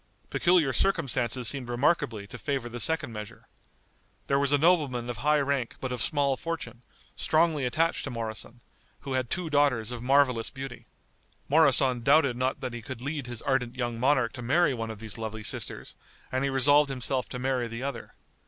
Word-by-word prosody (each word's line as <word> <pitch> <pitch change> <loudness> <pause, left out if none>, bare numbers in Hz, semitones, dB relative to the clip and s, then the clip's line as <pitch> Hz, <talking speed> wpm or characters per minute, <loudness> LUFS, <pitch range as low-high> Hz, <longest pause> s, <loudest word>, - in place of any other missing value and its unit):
Peculiar 175 -6 +3
circumstances 125 - +1
seemed 130 -1 +1
remarkably 120 -4 0
to 125 +4 -10
favor 135 -3 -2
the 120 +1 -6
second 160 -3 -1
measure. 110 +2 -9 0.8
There 140 - +1
was 140 0 +1
a 145 - +5
nobleman 140 -7 +2
of 120 - -7
high 150 +3 +2
rank 140 -4 -1
but 130 - -4
of 125 -3 -3
small 140 0 +1
fortune, 125 -8 -5 0.3
strongly 155 -3 +2
attached 165 +6 0
to - - -4
Moroson, 115 0 -5 0.4
who 135 - -5
had 130 -2 -1
two 180 -2 -2
daughters 135 -6 +2
of 120 -2 -6
marvelous 130 -2 +3
beauty. 135 -1 -8 0.6
Moroson 135 -5 +4
doubted 140 0 +4
not 130 +1 -1
that 125 -2 -4
he 120 - -6
could 120 +1 -7
lead 140 +1 -4
his 120 -2 -6
ardent 130 -3 0
young 120 -2 -3
monarch 130 -2 +2
to 125 - -7
marry 145 +5 +2
one 115 -2 -4
of 110 - -6
these 110 +1 -7
lovely 110 -1 -5
sisters, - - -3 0.4
and 130 +1 0
he 140 - +1
resolved 145 +2 +4
himself 130 0 -2
to 125 - -5
marry 125 -1 -1
the 115 +2 -6
other. 135 -3 -6
130 Hz, 185 wpm, -28 LUFS, 120-145 Hz, 0.8 s, a